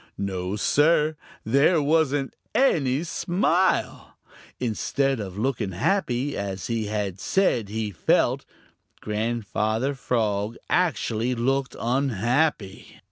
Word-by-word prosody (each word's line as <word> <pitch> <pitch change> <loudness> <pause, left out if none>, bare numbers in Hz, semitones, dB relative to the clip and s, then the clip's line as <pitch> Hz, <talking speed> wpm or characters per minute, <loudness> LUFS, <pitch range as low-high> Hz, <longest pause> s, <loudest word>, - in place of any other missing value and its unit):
No, 95 -1 -3
Sir, 150 +7 +3 0.3
there 140 +9 +4
wasn't 145 -2 +1 0.2
any 150 - +2
smile. 180 +1 0 0.4
Instead 135 +3 0
of 95 -2 -6
looking 110 -4 -1
happy, 135 - 0
as 95 -2 -4
he 115 -2 -2 0.3
said 120 - +1
he 110 0 -3
felt, 85 - +1 0.6
Grandfather 110 +3 -1
Frog 110 -4 -1
actually 125 -9 +1
looked 135 +3 0
unhappy. 120 -2 0
125 Hz, 90 wpm, -25 LUFS, 105-145 Hz, 0.6 s, there